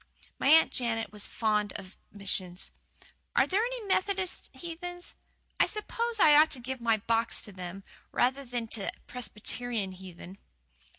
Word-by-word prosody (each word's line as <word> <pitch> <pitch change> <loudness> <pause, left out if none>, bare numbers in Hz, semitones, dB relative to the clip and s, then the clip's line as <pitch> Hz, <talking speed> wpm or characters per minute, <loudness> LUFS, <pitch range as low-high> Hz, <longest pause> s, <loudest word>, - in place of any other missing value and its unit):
My - - +1
Aunt 320 +3 +7
Jane 230 -2 0
was 210 -1 -5
fond 210 -2 +1
of 190 -1 -8 0.2
missions. 190 -3 0 0.6
Are - - +6
there 400 +4 +2
any - - -3
Methodist 380 -1 0
heathen? 355 +1 -6 0.6
I - - +6
s'pose 460 +2 -2
I 300 -5 +8
ought 310 +1 +7
to 265 - -3
give 255 +1 -5
my 230 -1 +3
box 230 +2 +1
to 210 - -8
them, 185 +1 -7 0.3
rather 265 +3 +2
than 240 -2 -3
to 205 -4 0
Presbyterian 235 -3 -2
heathen." 185 0 -11
235 Hz, 145 wpm, -30 LUFS, 205-325 Hz, 0.6 s, I